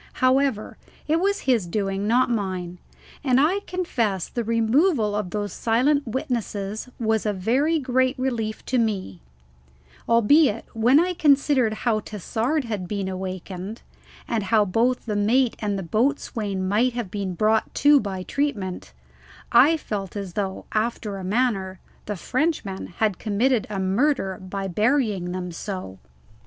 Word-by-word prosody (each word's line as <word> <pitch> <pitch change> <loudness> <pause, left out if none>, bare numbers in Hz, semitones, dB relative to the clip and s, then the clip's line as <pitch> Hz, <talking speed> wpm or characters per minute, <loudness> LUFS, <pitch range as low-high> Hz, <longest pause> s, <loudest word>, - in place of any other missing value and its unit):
However, 255 -3 +1 0.3
it 315 +2 +2
was 400 +1 +1
his 235 -9 +1
doing, 195 +1 -2
not 245 +3 +3
mine; 185 -5 -3 0.4
and 260 -2 +3
I 330 +8 +3
confess 235 - -1
the 240 - -3
removal 230 - +2
of 210 -3 -2
those 205 0 -3
silent 260 +5 +1
witnesses 220 -3 -3
was 220 -2 +1
a 210 - 0
very 260 - +1
great 260 -2 +1
relief 235 -4 -2
to 255 - +1
me, 195 - -2 0.9
albeit 230 +1 +4
when 240 +6 +4
I 360 +2 +1
considered 280 -7 +3
how 225 -3 +2
Tassard 225 - -2
had 210 -6 -4
been 200 0 -3
awakened, 185 +2 -6 0.4
and 220 -4 -1
how 215 0 +3
both 235 +6 +1
the 215 -3 -2
mate 230 +4 +2
and 205 -2 -1
the 195 - -4
boatswain 215 - -1
might 230 +6 +2
have 235 -6 -4
been 195 -3 -3
brought 215 +4 +2
to 290 0 +6
by 190 -5 -4
treatment, 205 -9 -3 0.6
I 325 +2 +6
felt 200 - -5
as 195 -3 -5
though, 190 -1 -3
after 215 -2 -2
a 190 - -7
manner, 195 -3 0 0.3
the 210 - -2
Frenchman 245 - -2
had 210 -5 +1
committed 225 +2 +1
a 200 -2 -3
murder 195 +1 +1
by 195 +1 -4
burying 210 -2 +1
them 180 -1 -4
so. 180 - -6
220 Hz, 145 wpm, -24 LUFS, 195-255 Hz, 0.9 s, to